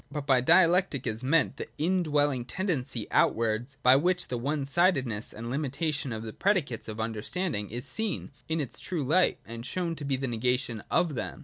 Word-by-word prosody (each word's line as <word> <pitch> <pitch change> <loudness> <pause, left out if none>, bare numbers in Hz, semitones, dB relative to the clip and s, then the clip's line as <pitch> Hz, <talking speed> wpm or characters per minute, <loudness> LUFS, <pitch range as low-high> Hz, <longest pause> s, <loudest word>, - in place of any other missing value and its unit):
But 145 -1 -4
by 130 -3 +4
Dialectic 170 -2 +4
is 110 +1 -2
meant 150 +5 +2
the - - -5
in 180 +5 +1
dwelling 145 -5 +1
tendency 160 -1 -2
outwards 115 +4 +1
by 125 +1 +7
which 180 +4 0
the 125 - -2
one 140 +3 -1
sidedness 135 - +1
and 115 +2 -6
limitation 140 0 -1
of 110 -1 -4
the 110 -1 -7
predicates 180 - 0
of 110 0 -6
understanding 110 - -2
is 120 +4 -4
seen 210 +8 -2 0.2
in 160 0 0
its 135 -5 -4
true 170 -5 -3
light, 170 +7 +3
and 115 0 -7
shown 170 +5 -2
to 150 - -6
be 140 -1 0
the 130 +1 -2
negation 120 -1 0
of 170 -4 +2
them. 125 - -4
140 Hz, 190 wpm, -28 LUFS, 120-165 Hz, 0.2 s, by